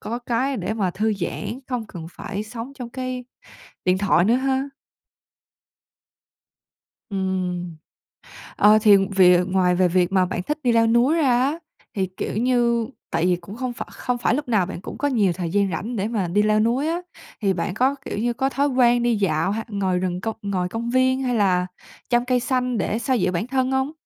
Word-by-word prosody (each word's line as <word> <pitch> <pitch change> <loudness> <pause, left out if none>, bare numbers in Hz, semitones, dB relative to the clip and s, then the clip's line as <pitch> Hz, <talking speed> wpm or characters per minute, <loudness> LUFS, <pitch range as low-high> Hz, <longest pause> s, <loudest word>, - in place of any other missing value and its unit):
có 235 +2 -4
cái 250 +2 -1
để 200 +2 -3
mà 195 -5 0
thư 215 +4 0
giãn, 205 +5 -4
không 245 -4 -3
cần 170 -6 -8
phải 205 0 -5
sống 230 +4 -8
trong 250 -3 -7
cái 255 -1 -5 0.6
điện 185 0 +2
thoại 190 -4 +3
nữa 230 +4 +3
ha! 265 +1 0 2.4
Ừm, 185 -3 -2 0.8
ờ, 210 +1 +6
thì 205 -3 +7 0.2
về 180 -1 +6
ngoài 185 -1 +2
về 180 0 +3
việc 180 +1 +1
mà 190 -1 +3
bạn 180 0 -3
thích 300 - -3
đi 245 - +3
leo 230 -1 +4
núi 240 +7 +3
ra 295 -6 +2
á, 285 +6 0 0.4
thì, 190 -1 0
kiểu - - -3
như, 235 -1 +2 0.2
tại 165 +1 +1
vì 180 -1 +3
cũng 180 +4 -10
không 250 0 -3
phải - - -7
không 250 -1 -3
phải 235 - +1
lúc 295 -2 -3
nào 210 -6 +2
bạn 180 -1 -7
cũng - - -8
có 285 - 0
nhiều 210 -10 +2
thời 175 -2 -4
gian 200 +1 +1
rảnh 220 +9 -4
để 200 0 -1
mà 210 -6 -1
đi 205 +5 +2
leo 215 0 +3
núi 245 +7 +1
á, 340 +2 -1 0.4
thì 195 -2 +2
bạn 180 0 -2
có, 260 +6 +2
kiểu - - -4
như, 235 +3 0
có 265 +2 0
thói 280 +1 +1
quen 245 -3 +3
đi 240 -2 +2
dạo 195 -3 +1
hay 225 +1 -3
ngồi 190 -3 0
rừng, 180 -1 -2
công 225 +2 -3
ngồi 185 -3 -2
công 230 +3 -4
viên 260 +1 +2
hay 250 -1 0
là 185 -4 +2 0.4
chăm 240 0 +2
cây 250 -1 +2
xanh 250 -1 -1
để 215 +3 -1
xoa 260 +1 0
dịu 185 -5 +1
bản 180 +6 -2
thân 260 0 0
hông? 265 +2 0
220 Hz, 210 wpm, -22 LUFS, 185-250 Hz, 2.4 s, thì